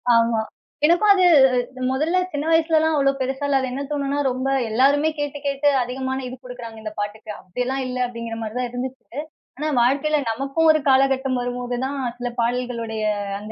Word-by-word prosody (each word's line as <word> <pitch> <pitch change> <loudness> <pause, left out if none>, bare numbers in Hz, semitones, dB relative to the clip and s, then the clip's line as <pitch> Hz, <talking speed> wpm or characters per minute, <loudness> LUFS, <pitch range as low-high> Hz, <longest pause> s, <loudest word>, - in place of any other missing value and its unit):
ஆமா. 230 -1 +3 0.5
எனக்கும் 350 +6 +5
அது 380 -2 +5 0.7
மொதல்ல 310 +7 +1
சின்ன 290 0 -3
வயசுலல்லாம் 320 -1 +3
அவ்வளோ 275 -1 +3
பெருசா 265 +2 -2
இல்ல. 275 -1 +3
அது 260 - -2
என்ன 265 +2 -4
தோணும்னா, 285 -1 -1
ரொம்ப 255 +1 -3 0.2
எல்லாருமே 280 +7 +3
கேட்டு 290 0 -3
கேட்டு 280 +1 +2
அதிகமான 260 +2 -3
இது 250 - -7
குடுக்குறாங்க 245 -3 -9
இந்த 215 -1 -5
பாட்டுக்கு, 210 +1 -5
அப்படியெல்லாம் 250 +8 -3
இல்ல 255 0 -4
அப்படீங்கிற 230 -1 -6
மாரி 220 -1 -5
தான் 250 0 -1
இருந்துச்சு. 250 0 -7 0.4
ஆனா, 300 +2 -2
வாழ்க்கைல 280 +5 +2
நமக்கும் 275 +8 +1
ஒரு 310 - +2
காலகட்டம் 265 -1 +3
வரும்போது 245 0 -3
தான், 280 +1 -3 0.2
சில 245 0 -3
பாடல்களுடைய 235 -2 -2 0.4
அந்த 210 +1 -9
260 Hz, 165 wpm, -22 LUFS, 245-285 Hz, 0.7 s, எனக்கும்